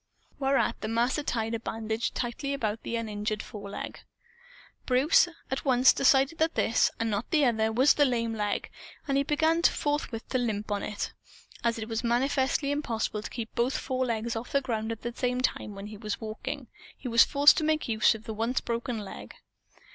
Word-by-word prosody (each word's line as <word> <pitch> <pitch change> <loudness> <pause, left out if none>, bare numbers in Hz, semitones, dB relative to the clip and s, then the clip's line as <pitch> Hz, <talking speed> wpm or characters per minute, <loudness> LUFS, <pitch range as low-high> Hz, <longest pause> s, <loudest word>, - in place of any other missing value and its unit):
Whereat, 270 0 +1
the 215 - -3
Master 235 +6 +1
tied 225 -5 -2
a 230 - -1
bandage 225 0 -3
tightly 270 +3 -2
about 220 -4 -2
the 235 - -4
uninjured 215 -1 -3
foreleg. 205 -1 -7 0.9
Bruce 270 +7 +5 0.2
at 265 - -2
once 255 -2 +5
decided 275 +3 +3
that 320 +1 +1
this, 225 - +3
and 225 -1 0
not 205 +3 -2
the 300 -4 +3
other, 220 -2 +2
was 255 +6 +5
the 295 - +3
lame 230 -3 0
leg; 210 -2 -2 0.4
and 275 - +1
he 275 - +4
began 315 +3 +2
forthwith 290 -8 0
to 255 - +1
limp 210 -3 -2
on 205 - 0
it. 205 -1 -4 0.5
As 235 -1 +1
it 220 -1 -5
was 225 +1 -3
manifestly 265 +4 +1
impossible 230 -7 -2
to - - -6
keep 225 -2 -6
both 250 +2 +1
forelegs 235 -3 -2
off 225 +2 -5
the 280 - +4
ground 225 -4 -2
at 225 - -6
the 240 0 -3
same 250 0 -1
time 210 -4 -1
when 195 0 -7
he 210 0 -8
was 210 -1 -4
walking, 220 0 -5 0.3
he - - -7
was 230 -1 +7
forced 285 0 +6
to 320 - +1
make 310 0 +1
use 220 -1 +3
of 220 - -10
the 220 - -5
once 230 +4 0
broken 235 0 -3
leg. - - -9
235 Hz, 195 wpm, -28 LUFS, 220-270 Hz, 0.9 s, was